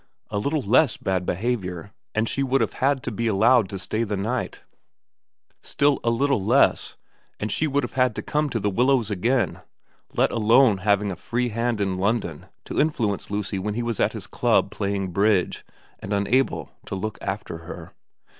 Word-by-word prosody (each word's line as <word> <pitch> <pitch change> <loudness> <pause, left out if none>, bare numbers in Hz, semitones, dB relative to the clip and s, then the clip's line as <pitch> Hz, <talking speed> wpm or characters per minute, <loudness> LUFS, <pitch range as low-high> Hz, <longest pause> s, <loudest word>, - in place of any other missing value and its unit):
A 105 - -1
little 140 +5 -1
less 125 +4 +3
bad 95 -1 -2
behaviour, 95 -3 -2 0.2
and 110 +1 +1
she 135 - -1
would 135 0 +2
have - - 0
had 135 0 +2
to 125 - -3
be 115 +2 -2
allowed 110 0 +4
to 100 - -4
stay 110 +4 -2
the 105 -2 -2
night; 115 +6 -3 1.0
still 140 -1 +1
a 115 - +2
little 125 -2 +1
less, 125 +7 +3 0.4
and 105 0 -3
she 160 - +1
would 145 -1 0
have 120 - -5
had 125 -3 +2
to - - -4
come 150 0 0
to 115 - -2
The 105 0 0
Willows 120 0 +2
again, 120 +6 0 0.5
let - - +3
alone 115 -1 +4
having 100 +1 +1
a - - -4
free 120 +7 -2
hand 115 0 -1
in 95 -2 -1
London 100 -6 -1 0.2
to - - -3
influence 115 -10 -1
Lucy 100 -1 -2
when 105 +2 -3
he 120 - -1
was 120 -3 -3
at - - +2
his - - -6
club - - +1
playing 100 -2 -2
bridge 100 0 +1 0.4
and 100 - -4
unable 115 +7 +1 0.2
to - - -4
look 105 +3 -4
after 80 - -4
her. 80 - -10
110 Hz, 185 wpm, -24 LUFS, 100-125 Hz, 1.0 s, allowed